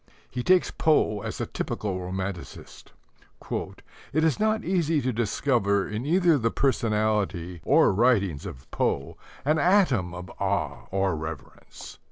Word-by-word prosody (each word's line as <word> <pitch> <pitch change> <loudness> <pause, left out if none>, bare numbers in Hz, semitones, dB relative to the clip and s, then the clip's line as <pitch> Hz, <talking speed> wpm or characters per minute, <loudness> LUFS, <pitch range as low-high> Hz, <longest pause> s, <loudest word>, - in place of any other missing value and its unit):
He 125 - -3
takes 185 +7 +3
Poe 150 -9 +2
as - - -5
a - - -1
typical 95 -3 -3
romanticist. 95 0 -6 0.6
"It 155 +2 -4
is 160 +4 +2
not 220 +1 +1
easy 165 -4 +1
to 130 -2 -1
discover 105 -3 +1
in 110 +6 -4
either 170 -2 +4
the 115 -1 +1
personality 105 - 0
or 145 - +4
writings 100 - +2
of 65 +1 -11
Poe 70 - -1 0.3
an 155 +2 +2
atom 140 - +3
of 90 0 -8
awe - - -2
or 95 -2 0
reverence. 80 0 -9
110 Hz, 135 wpm, -26 LUFS, 95-155 Hz, 0.6 s, either